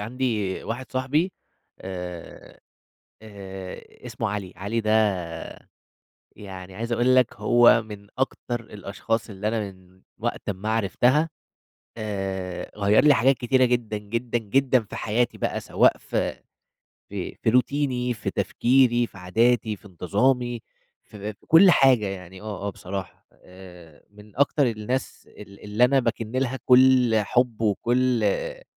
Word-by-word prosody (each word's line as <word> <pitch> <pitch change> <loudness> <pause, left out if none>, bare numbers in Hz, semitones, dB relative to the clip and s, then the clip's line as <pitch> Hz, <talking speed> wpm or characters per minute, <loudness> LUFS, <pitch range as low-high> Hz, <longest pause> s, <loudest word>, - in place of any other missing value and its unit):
عندي 110 -4 -2
واحد 120 +3 -6
صاحبي 145 +8 0 0.5
آآ 90 -2 -8 0.6
آآ 95 -3 -10
اسمه - - -3
علي. 100 -2 -5
علي 100 +5 -2
ده 110 -1 -1 1.5
يعني 95 -2 -10
عايز 115 +3 -5
أقول 120 +2 +3
لك 125 -2 +3
هو 120 -1 +5
من 105 -2 -11
أكتر 130 -2 -2
الأشخاص 105 +2 -4
اللي 105 +1 -4
أنا 110 +1 0
من 95 0 -22 0.2
وقت - - -3
أما 100 +2 -4
عرفتها 120 - +2 0.7
آآ 95 -4 -4
غيّر 105 +1 +4
لي 150 -1 +7
حاجات 130 +2 +3
كتيرة 130 +1 +3
جدًا، 120 -3 -1
جدًا، 115 +3 -3
جدًا 130 +4 +2
في 105 - -10
حياتي 115 +3 -1
بقى - - -2
سواء - - +3
في - - -3 0.7
في - - -5
في - - +3
روتيني، 125 0 +1
في 110 - -4
تفكيري، 120 -1 +2
في - - -16
عاداتي، 110 +4 +1
في 105 - -23
انتظامي، 120 +7 0 0.4
ف - - -18
في 105 +1 -5
كل 180 +4 +7
حاجة 130 -8 +4
يعني 95 -1 -7
آه، 105 -2 -5
آه - - 0
بصراحة. 95 0 -7
آآ 90 -4 -15
من 105 0 -17
أكتر 140 0 +2
الناس 115 +3 -4
ال 100 -1 -13
اللي 105 +4 +3
أنا 135 +2 +3
باكن 115 -3 -2
لها 130 +1 -1
كل 125 -2 +5
حُب، 120 +1 0
وكل 120 +3 +1
آآ 100 - -1
110 Hz, 140 wpm, -24 LUFS, 100-125 Hz, 1.5 s, لي